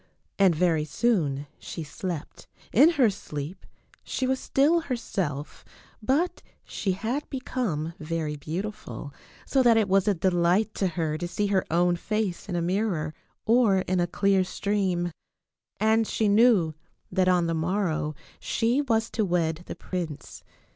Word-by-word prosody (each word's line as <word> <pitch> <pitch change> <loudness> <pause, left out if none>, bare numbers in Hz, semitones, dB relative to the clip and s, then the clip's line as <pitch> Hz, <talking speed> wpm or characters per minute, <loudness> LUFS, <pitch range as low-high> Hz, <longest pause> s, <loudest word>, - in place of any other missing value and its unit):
And 190 -4 +5
very 165 -2 +2
soon 150 - 0
she 165 - -6
slept. 160 +1 -6 0.3
In 285 +9 +7
her 255 -8 +4
sleep 155 -3 -7 0.4
she 260 - -2
was 260 0 +1
still 300 +5 +3
herself, 190 - -4 0.4
but 285 +11 0 0.2
she 190 - -2
had 235 +10 -3
become 220 - -2
very 155 -1 -3
beautiful, 165 -1 -6 0.3
so 270 - +2
that 235 -3 +5
it 220 -3 +3
was 195 +1 +3
a 205 - +3
delight 180 +4 +2
to 195 - 0
her 160 -3 -2
to 175 - -2
see 185 +4 -1
her 190 - +3
own 175 +1 +2
face 210 -1 -2
in 180 - -2
a 170 - 0
mirror 175 -4 -1 0.3
or 220 -5 +4
in 185 0 0
a 175 - +2
clear 195 +1 +2
stream. 185 -3 -1 0.7
And 220 0 +3
she 220 - 0
knew 205 -6 +4 0.4
that 185 -1 +2
on 180 -2 +3
the 165 - 0
morrow 160 -2 -1 0.2
she 235 +5 +1
was 225 -5 +1
to 220 - 0
wed 170 -3 0
the - - -5
prince. 165 -6 -6
185 Hz, 150 wpm, -26 LUFS, 165-220 Hz, 0.7 s, In